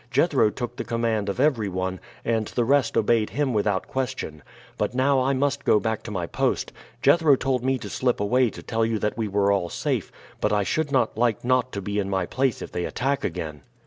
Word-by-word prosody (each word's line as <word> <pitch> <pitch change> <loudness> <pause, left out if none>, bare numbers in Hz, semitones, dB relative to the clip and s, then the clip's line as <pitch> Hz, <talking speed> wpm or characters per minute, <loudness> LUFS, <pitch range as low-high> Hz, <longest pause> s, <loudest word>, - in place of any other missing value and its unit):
Jethro 135 -4 +3
took 120 +2 -5
the - - -2
command 115 -3 -1
of 100 - -3
everyone, 95 -10 0 0.3
and 110 -2 0
the 120 - 0
rest 140 0 +2
obeyed 110 0 +2
him 140 0 -1
without 105 -2 0
question. 130 - -4 0.3
But - - -2
now 135 +1 +3
I 135 +2 +2
must 140 +1 0
go 105 - +4
back 110 -1 -2
to - - -8
my 95 -5 -2
post. - - -1 0.3
Jethro 150 0 +5
told 130 -2 -1
me 130 0 +1
to - - -8
slip 125 -1 0
away 125 +4 +3
to - - -10
tell 115 0 0
you 110 0 +1
that 105 0 -1
we 115 -2 -2
were 100 0 +2
all 95 -4 0
safe, - - -2 0.3
but - - +1
I 105 -1 +2
should 150 +7 -1
not 120 -5 +1
like 120 -2 +1
not 130 0 +2
to 100 - -4
be 105 +2 -2
in 100 -1 -1
my 95 -2 0
place 130 +4 -1
if - - -9
they 90 - -2
attack 135 +3 -1
again." 75 -4 -4
115 Hz, 220 wpm, -25 LUFS, 105-130 Hz, 0.3 s, Jethro